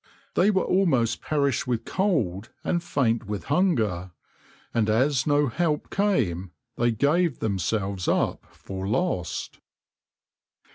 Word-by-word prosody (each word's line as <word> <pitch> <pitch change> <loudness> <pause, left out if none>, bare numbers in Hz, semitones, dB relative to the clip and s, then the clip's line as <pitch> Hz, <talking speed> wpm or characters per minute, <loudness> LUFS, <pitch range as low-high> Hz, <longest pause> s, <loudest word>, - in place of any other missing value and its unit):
They 195 - +4
were 190 -3 +2
almost 135 - +2
perished 140 -3 0
with 115 -2 -1
cold 120 - 0
and 175 -1 0
faint 115 -5 0
with 105 -1 -4
hunger, 110 - +1 0.6
and 110 -2 +1
as 130 +5 +2
no 145 0 +3
help 150 +3 -1
came 100 - 0 0.3
they 120 0 +2
gave 145 +6 +2
themselves 100 -1 -1
up - - 0
for 95 0 -6
lost. 110 - -2
120 Hz, 115 wpm, -25 LUFS, 105-165 Hz, 0.6 s, They